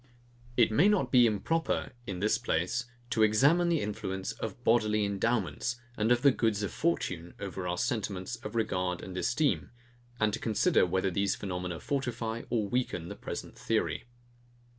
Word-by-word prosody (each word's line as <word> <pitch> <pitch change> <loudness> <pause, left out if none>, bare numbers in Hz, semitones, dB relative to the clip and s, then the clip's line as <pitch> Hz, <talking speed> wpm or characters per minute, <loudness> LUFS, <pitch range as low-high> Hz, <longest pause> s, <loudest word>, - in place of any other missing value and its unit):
It 115 -3 +5
may 160 - +5
not 210 -3 +2
be 125 -2 +7
improper, 140 +11 0 0.2
in 95 -2 -4
this 110 +2 +2
place, 120 +2 0 0.3
to 110 - +1
examine 140 +12 +4
the 165 -3 +2
influence 95 -2 -3
of 115 +2 -6
bodily 110 -3 +3
endowments, 115 +3 -1 0.2
and 110 +2 +1
of 120 +1 +3
the 140 - +7
goods 110 -4 0
of 100 - -2
fortune, 90 - -1
over 95 -2 -4
our 90 0 -1
sentiments 110 -3 -2
of 120 - -8
regard 90 -5 -1
and 95 - -7
esteem, 140 +10 +1 0.5
and 110 -1 +2
to 115 - -2
consider 110 -4 +3
whether 95 +1 0
these 100 +2 +1
phenomena 90 -3 -4
fortify 120 -5 -2
or 110 -4 0
weaken 100 -8 -2
the - - -6
present - - -6
theory. - - -1
110 Hz, 160 wpm, -30 LUFS, 95-120 Hz, 0.5 s, be